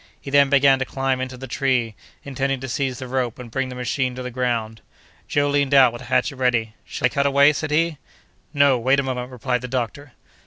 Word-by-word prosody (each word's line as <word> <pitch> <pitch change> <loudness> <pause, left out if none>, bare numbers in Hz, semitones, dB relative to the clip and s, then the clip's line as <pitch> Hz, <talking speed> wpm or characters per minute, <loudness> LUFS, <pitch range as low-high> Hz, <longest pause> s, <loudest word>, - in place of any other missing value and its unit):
He 140 - -9
then 140 -1 +5
began 140 -1 +4
to - - +1
climb 135 0 -1
into 130 0 -5
the 130 - -8
tree, 125 -3 0 0.3
intending 135 -1 -2
to 135 - -5
seize 130 0 -2
the 130 -1 -7
rope 125 -2 -2
and 120 -2 -10
bring 135 +2 -2
the 125 - -7
machine 125 +1 -2
to 130 - -6
the 125 - -5
ground. 115 -3 -2 0.5
Joe 145 0 +1
leaned 140 -1 +1
out 130 -3 +6
with 120 - -8
a - - -10
hatchet 130 +2 0
ready. 120 -4 0
"Shall - - -3
I - - +4
cut 140 +2 +1
away?" 140 +2 +5
said 155 +1 -3
he. 155 0 0 0.5
"No; 140 -3 +3
wait 130 +4 +2
a - - 0
moment," 125 -1 -4
replied 125 0 -2
the 125 - -5
doctor. 130 +2 -4
130 Hz, 230 wpm, -22 LUFS, 125-140 Hz, 0.5 s, out